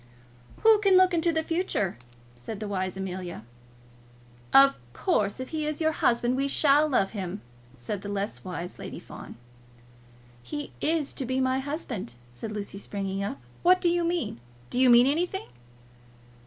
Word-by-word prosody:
"Who 440 -1 +7
can 395 -2 +5
look 370 0 +5
into 340 0 +2
the 320 -1 0
future?" 330 - -1 0.4
said 120 - -7
the 215 - -4
wise 185 -2 -2
Amelia. 180 - -5 1.1
"Of 275 0 +7 0.2
course, 215 - 0
if 260 - -5
he 310 -1 -2
is 305 -1 -3
your 315 -1 +2
husband, 240 -4 +2
we 275 +1 0
shall 290 +1 +4
love 200 -8 +2
him," 195 -1 -5 0.4
said 160 - -4
the 205 - -6
less 200 +1 -3
wise 180 -1 -6
Lady - - -7
Fawn. - - -10 1.1
"He 290 - -6
is 315 -2 0
to - - -4
be 260 +1 0
my 260 0 +1
husband," 265 - -5 0.2
said 120 - -6
Lucy, 200 -2 -5
springing 195 -1 -3
up. 170 -9 -4 0.2
"What 365 +1 +5
do 350 - +2
you 345 0 +1
mean? 335 - -1 0.3
Do - - -1
you 260 -1 +6
mean 240 +1 +8
anything?" 350 +7 0
260 Hz, 165 wpm, -27 LUFS, 195-320 Hz, 1.1 s, mean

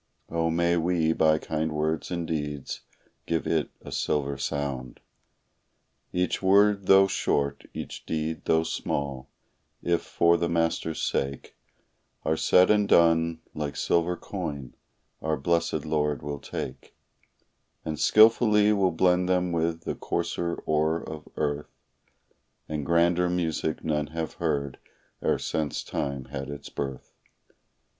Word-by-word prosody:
Oh, 85 0 0
may 85 +1 +2
we, 85 -1 +2
by 80 -1 +4
kind 80 0 -2
words 80 +1 -1
and 85 -2 -2
deeds, 75 -3 -4 0.5
give 85 -1 0
it 80 -3 0
a - - -10
silver 70 -1 -1
sound! 70 -2 -3 1.1
Each 90 0 0
word 100 0 +4
though 95 0 +7
short, 70 -6 -1
each - - -7
deed 80 0 -3
though 80 0 +3
small, 70 -4 -3 0.5
if 85 -1 +1
for 85 0 +3
the 85 0 -1
Master's 80 -1 0
sake 70 0 -2 0.7
Are 80 - +2
said 90 +4 +5
and 105 -1 +3
done, 85 -1 +4
like 75 -1 -4
silver 85 +1 +1
coin, 75 -9 -5 0.5
our 80 -1 0
blessed 85 +1 0
Lord 75 -3 0
will 70 -1 -4
take, 65 -1 -7 0.9
And 80 -1 -3
skillfully 110 -1 +5
will 100 -2 +3
blend 90 +2 +2
them 90 -1 +2
with 85 0 0
the - - -2
coarser 85 0 -2
ore 80 +1 +1
of 75 -1 -8
earth, 75 0 -1 1.0
And 75 -1 -3
grander 85 +1 +3
music 80 -3 -1
none 75 -1 0
have 80 +1 -4
heard 70 -4 -1 0.4
e'er - - +2
since 75 -2 -2
time 70 -2 -3
had 70 +1 -6
its 70 -1 -7
birth. 70 -2 -5
80 Hz, 130 wpm, -27 LUFS, 75-85 Hz, 1.1 s, though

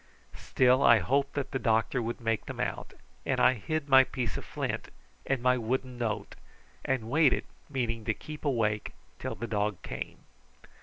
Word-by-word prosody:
Still 130 +1 +3
I 120 - +7
hoped 140 +9 +1
that 140 -2 -2
the 135 - -1
doctor 115 +2 +1
would 115 +1 -3
make 115 -1 -1
them - - -6
out, - - -3 0.3
and - - 0
I 130 - +6
hid 145 +7 -3
my 135 -1 +8
piece 125 -3 -3
of - - -5
flint - - -4 0.4
and 135 -3 0
my 125 0 +4
wooden 125 +2 -2
note 110 -3 -2 0.5
and 130 -4 -1
waited, 150 -2 +4 0.3
meaning 120 -5 -2
to 110 - 0
keep 155 -1 -9
awake 110 -7 0 0.3
till - - -4
the 120 - -4
dog 105 -4 -1
came. - - -6
125 Hz, 170 wpm, -29 LUFS, 115-135 Hz, 0.5 s, my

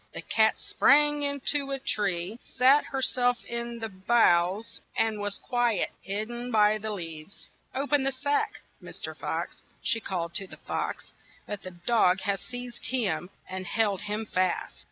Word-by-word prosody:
The - - -4
cat 220 -1 +3
sprang 295 +1 +4
in 285 -1 0
to 285 -2 0
a 275 - -1
tree, 200 -4 -1
sat 265 +4 +4
her 265 -1 -3
self 245 -1 +2
in 235 0 -3
the 225 -1 -3
boughs, 190 -1 +2 0.2
and 220 -2 +2
was 205 -1 -2
quite 240 -3 +1
hid 205 +3 -2
den 240 +1 -5
by 215 -2 +4
the 215 +1 -4
leaves. 165 -3 -7 0.3
"O 275 +2 +1
pen 290 -1 +3
the 270 +1 +2
sack, 290 +11 -1 0.2
Mr. - - -7
Fox," - - -4 0.2
she 225 - +3
called 170 -5 -3
to 195 +2 -2
the - - -12
fox, - - -4 0.3
but 205 -1 -5
the 185 - -7
dogs 185 +1 +2
had 200 -1 0
seized 245 +3 -7
him 190 -9 -1 0.2
and 185 0 -5
held 210 -4 +1
him 210 +1 -3
fast. 185 -3 -1
220 Hz, 170 wpm, -28 LUFS, 190-250 Hz, 0.3 s, sprang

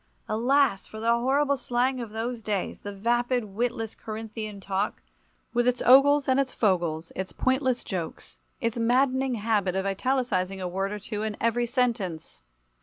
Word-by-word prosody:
Alas! 240 -1 +2
for 220 - -9
the 230 +1 +2
horrible 275 +4 +2
slang 255 0 0
of 230 - -5
those 225 +2 -4
days, 205 -3 -2
the 205 - -6
vapid 240 +4 +1
witless 225 +2 -2
Corinthian 215 -1 -6
talk, 195 +1 -2 0.5
with 240 0 +2
its 250 0 +2
ogles 275 +3 +6
and 260 0 +3
its 270 -2 0
fogles, 170 -6 0
its 190 0 -4
pointless 260 -1 0
jokes, 175 -5 -6 0.2
its 230 -2 -1
maddening 260 +2 +2
habit 205 -4 0
of 190 0 -1
italicizing 195 -3 0
a 185 - -3
word 195 +2 -2
or 210 - -3
two 210 +1 -5
in 215 -1 -3
every 240 +1 +1
sentence. 230 - -1
230 Hz, 160 wpm, -27 LUFS, 200-250 Hz, 0.5 s, ogles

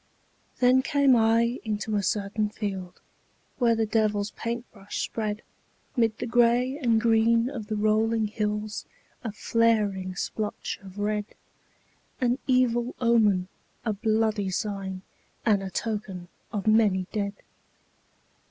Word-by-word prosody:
Then 255 +1 +6
came 280 -1 +4
I 230 +1 +3
into 215 0 -2
a 205 - +2
certain 205 +2 -1
field 195 -4 -5 0.6
Where 235 -2 +4
the 225 0 +1
devil's 210 -1 +1
paint 235 +1 -4
brush 200 -2 -8
spread 215 -1 -3 0.5
'Mid 225 -3 +2
the - - -3
gray 245 +3 +3
and 235 -5 +3
green 230 +2 +3
of 225 -7 -6
the 215 - -2
rolling 215 +1 +2
hills 210 0 -3 0.4
A 225 - -3
flaring 205 -4 +1
splotch 210 +3 -3
of 195 0 -12
red, 210 0 -1 0.9
An 250 0 +1
evil 250 -2 +2
omen, 215 -6 +3 0.4
a 220 - +1
bloody 215 -1 +1
sign, 190 -1 -3 0.4
And 210 -4 +3
a 195 - -4
token 195 -4 -4 0.2
of 205 -4 -3
many 215 -4 +4
dead. 200 -1 -1
215 Hz, 125 wpm, -27 LUFS, 205-230 Hz, 0.9 s, Then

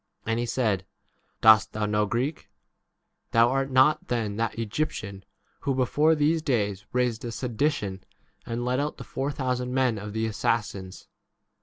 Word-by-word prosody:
And 115 +1 0
he 120 - -1
said, 110 -7 0 0.6
Dost 110 -1 +6
thou 110 - -4
33 105 0 0
know 105 0 +2
Greek? 130 +8 -2 0.8
Thou 115 +1 +6
art 135 0 0
not 135 +4 +4
then 110 -4 -1
that 115 0 -1
Egyptian 105 -4 -3 0.4
who 135 - -1
before 145 +5 +3
these 155 +2 +2
days 105 -9 -1
raised 125 -2 0
a 120 - -4
sedition 115 -5 -2 0.4
and 120 +1 -3
led 125 +1 +1
out 145 +1 -2
the - - -7
four 135 +2 -3
thousand 125 -2 -2
men 125 -5 +2
of 105 +1 -7
the 110 - -2
39 110 - 0
assassins 100 -3 -2
120 Hz, 165 wpm, -26 LUFS, 105-135 Hz, 0.8 s, Dost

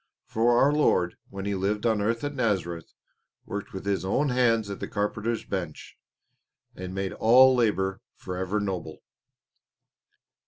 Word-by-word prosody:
For 120 +2 +2
our 140 +4 +4
Lord, 90 -12 +2
when 100 0 -6
He 100 - -1
lived 100 +3 -1
on 110 -3 +2
earth 115 +3 -1
at 145 0 -2
Nazareth, 95 - -2 0.5
worked 100 0 -6
with 95 +1 -7
His 100 -2 0
own 135 +10 +1
hands 115 -4 +2
at 100 - -6
the - - -4
carpenter's 110 +2 -2
bench, 85 -6 -5 0.8
and 95 0 -7
made 95 0 -2
all 130 +3 +6
labour 95 -6 0
forever 95 +3 -3
noble. 95 -5 -4
105 Hz, 145 wpm, -26 LUFS, 95-115 Hz, 0.8 s, all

